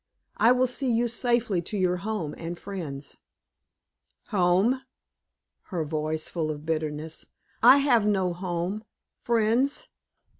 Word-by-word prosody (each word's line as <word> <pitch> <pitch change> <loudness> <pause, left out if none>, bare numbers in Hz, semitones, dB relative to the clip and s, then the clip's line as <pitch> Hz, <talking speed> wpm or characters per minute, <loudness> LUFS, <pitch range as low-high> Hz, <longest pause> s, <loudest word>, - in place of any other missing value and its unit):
I 230 - +5
will 250 +1 +4
see 255 +1 0
you 235 +1 +2
safely 235 -5 +1
to 205 +5 -4
your 180 -1 +1
home 180 -5 -3
and 170 +1 -6
friends." 155 -9 -7 1.1
"Home?" 195 +7 +3 0.8
her 170 -5 -3
voice 155 +1 -2
full 160 -3 -2
of 150 0 -5
bitterness 155 0 -3 0.3
"I 270 - +9
have 245 -7 +3
no 190 -4 +1
home. 180 +3 -3 0.4
Friends? 240 - +1
190 Hz, 120 wpm, -27 LUFS, 165-235 Hz, 1.1 s, I